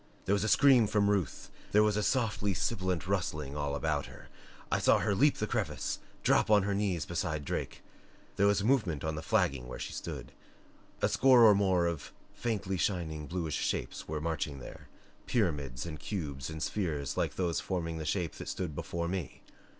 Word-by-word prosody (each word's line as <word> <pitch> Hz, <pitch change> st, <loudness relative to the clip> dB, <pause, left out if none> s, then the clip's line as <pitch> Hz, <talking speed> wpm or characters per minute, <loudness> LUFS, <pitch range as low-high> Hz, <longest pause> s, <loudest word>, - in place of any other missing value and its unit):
There 95 Hz, -, +2 dB
was 100 Hz, 0 st, +1 dB
a -, -, 0 dB
scream 130 Hz, -5 st, +6 dB
from 100 Hz, 0 st, +2 dB
Ruth; 95 Hz, -7 st, -2 dB, 0.2 s
there 105 Hz, +1 st, +6 dB
was 105 Hz, 0 st, +2 dB
softly 110 Hz, -6 st, 0 dB
sibilant 95 Hz, -1 st, -1 dB
rustling 75 Hz, -7 st, -2 dB
all 75 Hz, -1 st, -2 dB
about 75 Hz, -1 st, -1 dB
her. -, -, -13 dB, 0.4 s
I -, -, +2 dB
saw -, -, +5 dB
her 105 Hz, -, +1 dB
leap 145 Hz, +8 st, +4 dB
the 110 Hz, -, -1 dB
crevice, 100 Hz, -, -2 dB, 0.2 s
drop -, -, +3 dB
on 105 Hz, -2 st, +5 dB
her 100 Hz, +1 st, 0 dB
knees 100 Hz, -6 st, 0 dB
beside 85 Hz, -4 st, -2 dB
Drake. -, -, -4 dB, 0.5 s
There 100 Hz, -, +4 dB
was 100 Hz, -1 st, +2 dB
movement 105 Hz, -, +1 dB
on 80 Hz, 0 st, -1 dB
the 75 Hz, -, -4 dB
flagging 70 Hz, -5 st, +1 dB
where 65 Hz, -, -6 dB
she -, -, -5 dB
stood. -, -, -6 dB, 0.7 s
A -, -, +6 dB
score 130 Hz, -3 st, +6 dB
or 110 Hz, -2 st, +9 dB
more 95 Hz, -3 st, +2 dB
of 85 Hz, -3 st, -3 dB, 0.2 s
faintly 100 Hz, -5 st, -2 dB
shining, 80 Hz, -5 st, -2 dB
bluish 85 Hz, -3 st, -2 dB
shapes -, -, -3 dB
were 75 Hz, 0 st, -3 dB
marching 80 Hz, -1 st, -2 dB
there 65 Hz, -, -10 dB, 0.4 s
pyramids 75 Hz, -, -1 dB
and 80 Hz, -3 st, -6 dB
cubes 75 Hz, -10 st, -4 dB
and 80 Hz, 0 st, -4 dB
spheres 75 Hz, -9 st, -2 dB
like -, -, -1 dB
those 85 Hz, -3 st, 0 dB
forming 85 Hz, -3 st, -3 dB
the -, -, -3 dB
shape 85 Hz, +2 st, -1 dB
that -, -, -6 dB
stood 90 Hz, -5 st, -3 dB
before 85 Hz, +3 st, -3 dB
me. 90 Hz, -1 st, -4 dB
90 Hz, 185 wpm, -31 LUFS, 80-100 Hz, 0.7 s, or